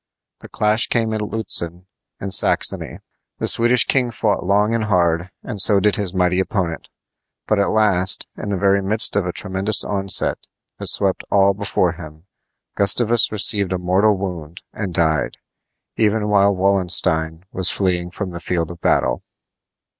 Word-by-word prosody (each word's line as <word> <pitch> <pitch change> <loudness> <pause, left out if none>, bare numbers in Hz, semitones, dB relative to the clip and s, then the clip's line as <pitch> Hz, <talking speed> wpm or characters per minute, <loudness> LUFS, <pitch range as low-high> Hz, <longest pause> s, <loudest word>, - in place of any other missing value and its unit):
The - - -12
clash 105 +2 0
came 115 -2 -1
at 110 - -3
Lutzen, 90 -5 -1 0.3
in 100 - -6
Saxony. - - +1 0.4
The - - -3
Swedish 120 +1 +3
king 130 -3 0
fought 110 -2 -2
long 105 +4 +1
and 115 -2 -1
hard, 85 -3 0
and 100 - -2
so 100 0 +6
did 105 +1 +1
his 100 -3 -3
mighty 90 0 0
opponent; 90 -4 -3 0.6
but 110 - 0
at 100 - +1
last, 100 -4 +1
in 105 - -7
the 100 - -2
very 100 +1 +1
midst 105 +3 +3
of 100 -3 0
a - - -2
tremendous 95 +3 -1
onset 95 -1 0 0.3
that - - -5
swept - - +2
all 100 0 +3
before 95 -3 -1
him, 80 -2 -12 0.5
Gustavus 115 +3 +2
received 100 -2 +2
a - - -1
mortal 95 +4 +1
wound 90 -3 -7
and 100 -4 -5
died, 80 -4 -1 0.6
even 105 -1 0
while 100 -1 +3
Wallenstein 90 -3 +1
was 95 0 0
fleeing 90 -3 -1
from 95 +1 -6
the 85 - -7
field 85 -1 -3
of 85 -1 -13
battle. - - 0
95 Hz, 160 wpm, -19 LUFS, 90-105 Hz, 0.6 s, so